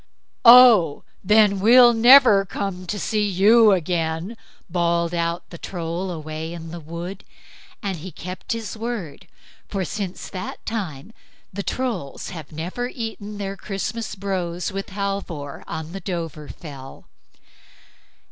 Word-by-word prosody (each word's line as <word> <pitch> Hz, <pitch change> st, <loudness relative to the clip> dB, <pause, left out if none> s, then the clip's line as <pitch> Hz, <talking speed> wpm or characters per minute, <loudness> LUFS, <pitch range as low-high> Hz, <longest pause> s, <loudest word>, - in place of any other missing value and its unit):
"Oh, 235 Hz, -, +8 dB, 0.2 s
then, 210 Hz, 0 st, +4 dB
we'll 240 Hz, +4 st, +7 dB
never 240 Hz, -3 st, +7 dB
come 185 Hz, -2 st, -5 dB
to 205 Hz, -, -3 dB
see 215 Hz, +1 st, -1 dB
you 210 Hz, +3 st, +5 dB
again", 170 Hz, +2 st, -1 dB, 0.3 s
bawled 170 Hz, -1 st, 0 dB
out 170 Hz, 0 st, -2 dB
the 170 Hz, -, -9 dB
Troll 175 Hz, +1 st, -4 dB
away 160 Hz, -1 st, -6 dB
in 165 Hz, -1 st, -8 dB
the 170 Hz, -, -7 dB
wood, 170 Hz, +4 st, -7 dB, 0.6 s
and 195 Hz, -3 st, -2 dB
he 175 Hz, +4 st, -8 dB
kept 185 Hz, +6 st, -6 dB
his 230 Hz, -1 st, -5 dB
word; 215 Hz, -7 st, -6 dB, 0.4 s
for 195 Hz, -3 st, -3 dB
since 195 Hz, -1 st, -5 dB
that 185 Hz, -1 st, -7 dB
time 200 Hz, -4 st, -5 dB, 0.4 s
the 200 Hz, -, -3 dB
Trolls 200 Hz, -, -4 dB
have 160 Hz, -5 st, -9 dB
never 175 Hz, +10 st, -4 dB
eaten 220 Hz, -4 st, -6 dB
their 195 Hz, -1 st, -4 dB
Christmas 210 Hz, +3 st, -4 dB
brose 185 Hz, -3 st, -3 dB
with 195 Hz, +1 st, -5 dB
Halvor 195 Hz, -7 st, -4 dB
on 160 Hz, 0 st, -6 dB
the 195 Hz, +2 st, -7 dB
Dovrefell. 150 Hz, -5 st, -7 dB
190 Hz, 130 wpm, -22 LUFS, 170-210 Hz, 0.6 s, Oh